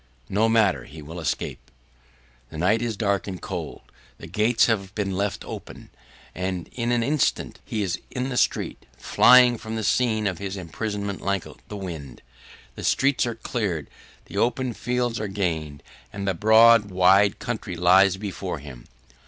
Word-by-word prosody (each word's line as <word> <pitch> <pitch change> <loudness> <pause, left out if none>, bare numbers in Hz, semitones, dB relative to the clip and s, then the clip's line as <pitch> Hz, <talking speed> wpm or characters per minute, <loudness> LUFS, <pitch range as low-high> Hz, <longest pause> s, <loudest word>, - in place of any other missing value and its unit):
No 110 +3 +2
matter; 110 -4 +2
he 75 +2 -11
will 80 +4 -8
escape. 80 -5 -4 0.8
The 80 - -9
night 100 +7 +2
is 115 -3 -2
dark 100 -2 0
and 95 -2 -5
cold, - - -6 0.4
the - - -10
gates 110 +7 +2
have 100 -4 -1
been 100 -2 -1
left 100 +1 -2
open, - - -9 0.4
and 90 -2 -3
in 120 -1 -2
an 120 -1 +2
instant 145 +2 0
he 110 -2 -3
is 95 -2 -3
in 130 +1 -3
the 125 - -4
street, - - -1
flying 125 - +6
from 110 0 -6
the 110 - -3
scene 110 -2 +1
of 95 -4 -1
his 100 0 -5
imprisonment 100 +3 -4
like 100 -2 -1 0.2
the 105 - -7
wind. 80 -9 -8 0.5
The - - -9
streets 135 -2 +2
are 120 - -3
cleared, 100 - -3 0.3
the - - -8
open 125 +1 0
fields 120 +2 -2
are 105 - -3
gained 80 -7 -3 0.3
and 100 -1 -5
the 95 - +2
broad, 110 +2 +6
wide 95 +2 +4
country 110 -7 -5
lies 95 +2 +5
before 95 -3 -5
him. 70 -4 -11
100 Hz, 165 wpm, -24 LUFS, 90-115 Hz, 0.8 s, flying